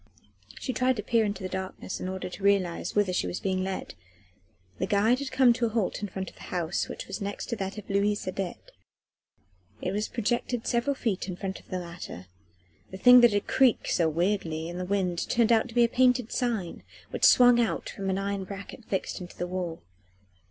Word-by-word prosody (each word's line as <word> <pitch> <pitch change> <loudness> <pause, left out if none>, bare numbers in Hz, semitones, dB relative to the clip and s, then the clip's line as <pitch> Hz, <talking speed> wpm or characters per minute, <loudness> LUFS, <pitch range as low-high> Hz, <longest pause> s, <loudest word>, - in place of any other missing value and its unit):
She 255 - -3
tried 255 +2 +2
to 210 - -4
peer 230 -2 +2
into 205 -2 -3
the - - -1
darkness 190 0 -5
in 185 - -4
order 190 0 -4
to 180 - -9
realise 195 -4 +1
whither 205 -3 +2
she - - 0
was 180 - -3
being 185 -1 -1
led. 190 0 -4 0.9
The 185 - 0
guide 215 +5 +3
had 280 -1 -4
come 255 -3 +5
to 235 0 0
a - - -2
halt 220 -3 -1
in 205 - -2
front 190 0 -5
of - - -24
the - - -15
house 175 -1 -1
which - - -6
was - - -6
next 200 0 -4
to 235 - -1
that 195 +1 -4
of 210 - -8
Louise 205 +1 +1
Adet: 185 -1 -5 1.1
it 200 - -2
projected 240 0 -1
several 245 +4 +1
feet 215 -8 -2
in 185 - -4
front 190 +1 -5
of - - -22
the 185 - -2
latter: 170 - -8 0.6
the 190 - -8
thing 250 +4 +8
that 240 -1 +7
had 205 0 0
creaked 260 -3 +3
so 165 -3 +3
weirdly 165 -1 -1
in 175 +1 -6
the 180 - -3
wind 180 -3 -1
turned 235 -1 +3
out 230 +2 +3
to 230 - -12
be 240 - +6
a - - +5
painted 250 -1 +2
sign, 225 -9 -2 0.3
which - - -5
swung 245 -1 +7
out 230 - -1
from 195 -1 -4
an 190 - 0
iron 195 0 -2
bracket 200 +4 -9
fixed 195 -2 -3
into 175 - -10
the 175 - -2
wall. 180 -2 -4
200 Hz, 215 wpm, -28 LUFS, 185-235 Hz, 1.1 s, thing